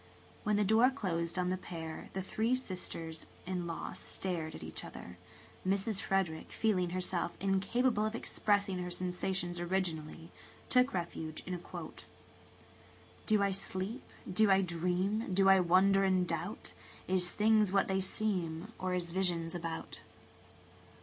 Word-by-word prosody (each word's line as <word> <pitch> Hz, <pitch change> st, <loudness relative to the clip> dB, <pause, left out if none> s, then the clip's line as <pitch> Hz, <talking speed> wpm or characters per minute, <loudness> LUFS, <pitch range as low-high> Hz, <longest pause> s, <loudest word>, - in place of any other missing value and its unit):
When 210 Hz, 0 st, +2 dB
the 210 Hz, -, +3 dB
door 220 Hz, +5 st, +5 dB
closed 170 Hz, -10 st, -2 dB
on 180 Hz, 0 st, +1 dB
the 185 Hz, -, 0 dB
pair 160 Hz, -3 st, -7 dB
the 190 Hz, -, -2 dB
three 225 Hz, +6 st, +1 dB
sisters 165 Hz, -8 st, -3 dB, 0.2 s
in 180 Hz, -1 st, -2 dB
laws 165 Hz, -, -5 dB
stared 165 Hz, -4 st, -3 dB
at -, -, -8 dB
each 80 Hz, -, -5 dB
other. -, -, -9 dB, 0.4 s
Mrs. 195 Hz, +2 st, +1 dB
Frederick, 185 Hz, -5 st, -1 dB
feeling 185 Hz, -5 st, +1 dB
herself 180 Hz, -1 st, -1 dB
incapable 210 Hz, +4 st, +2 dB
of 215 Hz, -, -4 dB
expressing 205 Hz, -4 st, +1 dB
her 180 Hz, 0 st, -3 dB
sensations 180 Hz, 0 st, -1 dB
originally, 170 Hz, -3 st, -2 dB, 0.4 s
took 250 Hz, +1 st, +4 dB
refuge 165 Hz, -3 st, -4 dB
in 185 Hz, -, -4 dB
a 180 Hz, -, -3 dB
quotation: -, -, -8 dB, 0.6 s
" -, -, -25 dB
'Do 215 Hz, -2 st, +4 dB
I 200 Hz, -, +2 dB
sleep, 195 Hz, +5 st, -3 dB, 0.3 s
do 215 Hz, +3 st, +5 dB
I 195 Hz, 0 st, +6 dB
dream, 180 Hz, +5 st, 0 dB
do 195 Hz, 0 st, +5 dB
I 195 Hz, 0 st, +8 dB
wonder 190 Hz, +2 st, +5 dB
and 185 Hz, -2 st, +3 dB
doubt? 170 Hz, +6 st, -3 dB, 0.3 s
Is 180 Hz, -1 st, +2 dB
things 215 Hz, -2 st, +4 dB
what 195 Hz, 0 st, +3 dB
they 190 Hz, 0 st, +1 dB
seem, 190 Hz, -1 st, -1 dB
or 185 Hz, -1 st, 0 dB
is 175 Hz, -2 st, -1 dB
visions 170 Hz, -3 st, 0 dB
about?' 165 Hz, -2 st, -5 dB
185 Hz, 150 wpm, -33 LUFS, 175-200 Hz, 0.6 s, I